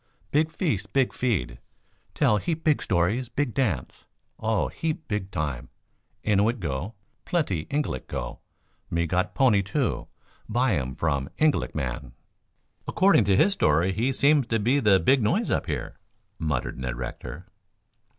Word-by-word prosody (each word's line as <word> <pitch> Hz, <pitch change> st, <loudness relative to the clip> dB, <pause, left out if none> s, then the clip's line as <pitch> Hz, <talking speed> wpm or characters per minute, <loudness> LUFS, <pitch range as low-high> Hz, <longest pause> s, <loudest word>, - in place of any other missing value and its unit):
Big 155 Hz, +2 st, +3 dB
feast, 145 Hz, -, -2 dB
big 135 Hz, -2 st, +2 dB
feed, 105 Hz, -, -1 dB, 0.6 s
tell 105 Hz, -, +3 dB
heap 160 Hz, +7 st, -2 dB
big 155 Hz, -2 st, +3 dB
stories, 105 Hz, +7 st, +1 dB
big 135 Hz, -1 st, -1 dB
dance. 100 Hz, -, -2 dB, 0.3 s
Oh, 110 Hz, -1 st, +1 dB
heap 160 Hz, -1 st, -3 dB
big 105 Hz, -4 st, -2 dB
time. 75 Hz, -9 st, -3 dB, 0.6 s
Innuit 110 Hz, +3 st, +2 dB
go, 85 Hz, +5 st, -3 dB, 0.3 s
plenty 100 Hz, -, -1 dB
Ingalik 145 Hz, +1 st, -2 dB
go. -, -, -5 dB, 0.5 s
Me 85 Hz, 0 st, 0 dB
got 90 Hz, +3 st, -1 dB
pony, 120 Hz, -7 st, +4 dB
too. 105 Hz, +6 st, -1 dB, 0.4 s
Buy 120 Hz, -1 st, +2 dB
um 65 Hz, -1 st, -5 dB
from 70 Hz, -4 st, -1 dB
Ingalik 155 Hz, -1 st, +1 dB
man." 65 Hz, -3 st, -4 dB, 0.7 s
"According 190 Hz, -, +4 dB
to 95 Hz, -1 st, +3 dB
his 200 Hz, -, +4 dB
story 85 Hz, -, +2 dB
he 120 Hz, +7 st, +1 dB
seems 140 Hz, -1 st, +3 dB
to 115 Hz, -, +1 dB
be 120 Hz, +7 st, +2 dB
the 105 Hz, -6 st, +5 dB
big 130 Hz, +10 st, +3 dB
noise 105 Hz, -, +1 dB
up -, -, 0 dB
here," -, -, -4 dB, 0.4 s
muttered 75 Hz, -5 st, -2 dB
Ned 65 Hz, -1 st, -3 dB
Rector. 70 Hz, +7 st, -7 dB
105 Hz, 145 wpm, -26 LUFS, 80-135 Hz, 0.7 s, the